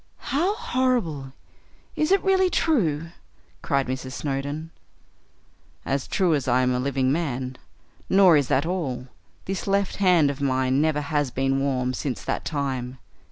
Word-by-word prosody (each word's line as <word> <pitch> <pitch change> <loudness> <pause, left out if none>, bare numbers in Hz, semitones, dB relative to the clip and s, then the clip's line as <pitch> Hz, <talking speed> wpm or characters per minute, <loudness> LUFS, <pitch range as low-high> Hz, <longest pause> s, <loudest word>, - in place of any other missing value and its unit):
"How 355 +9 +1
horrible! 230 - -1 0.6
Is 305 +3 0
it 390 - +4
really 380 -1 +3
true?" 170 - +1 0.5
cried 140 -3 0
Mrs. 130 0 -5
Snowdon. 145 +3 -4 1.1
"As 135 0 -1
true 185 -4 +2
as 140 -4 -1
I 130 +1 +3
am 125 0 +2
a 125 - 0
living 130 0 0
man. 130 -5 -2 0.5
Nor 190 -3 +6
is 145 -3 +2
that 140 +4 +1
all: 135 -8 -3 0.4
this 190 0 -4
left 200 -1 0
hand 180 -7 +4
of 140 0 -8
mine 130 0 +1
never 155 -1 +1
has 145 -1 -1
been 135 +2 0
warm 130 -2 0
since 130 0 -4
that - - -3
time. 130 -4 -3
145 Hz, 150 wpm, -24 LUFS, 130-180 Hz, 1.1 s, Nor